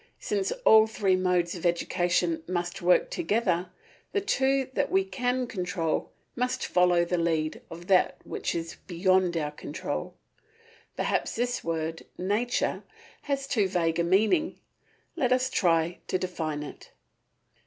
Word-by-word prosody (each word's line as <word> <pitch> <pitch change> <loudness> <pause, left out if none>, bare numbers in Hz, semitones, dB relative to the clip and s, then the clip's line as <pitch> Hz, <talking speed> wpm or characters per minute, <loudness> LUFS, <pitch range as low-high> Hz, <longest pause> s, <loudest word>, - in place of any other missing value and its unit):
Since 420 -4 -1
all 220 0 +7
three 200 -4 +1
modes 180 -2 +1
of 175 - -8
education 175 -1 +1
must 175 +1 -3
work 180 +1 +3
together, 180 -2 0 0.4
the 405 - +2
two 270 -9 +1
that - - 0
we 190 0 +3
can 245 +6 -1
control 180 -6 -2 0.3
must 250 +1 -1
follow 180 -1 +3
the 175 0 -1
lead 160 -2 0
of 170 +1 -9
that 185 -1 +3
which - - -3
is 165 0 -4
beyond 185 -1 +2
our 150 -2 -1
control. 150 - -5 0.8
Perhaps - - -1
this 245 +1 -1
word 165 0 -3
Nature 210 +7 0 0.5
has 275 -1 0
too 220 -7 +1
vague 170 -3 0
a - - +3
meaning. 220 - +2 0.6
Let 250 -2 0
us 255 0 +2
try 165 -1 +2
to - - +1
define 160 -5 -3
it. 145 - -10
180 Hz, 140 wpm, -27 LUFS, 170-235 Hz, 0.8 s, all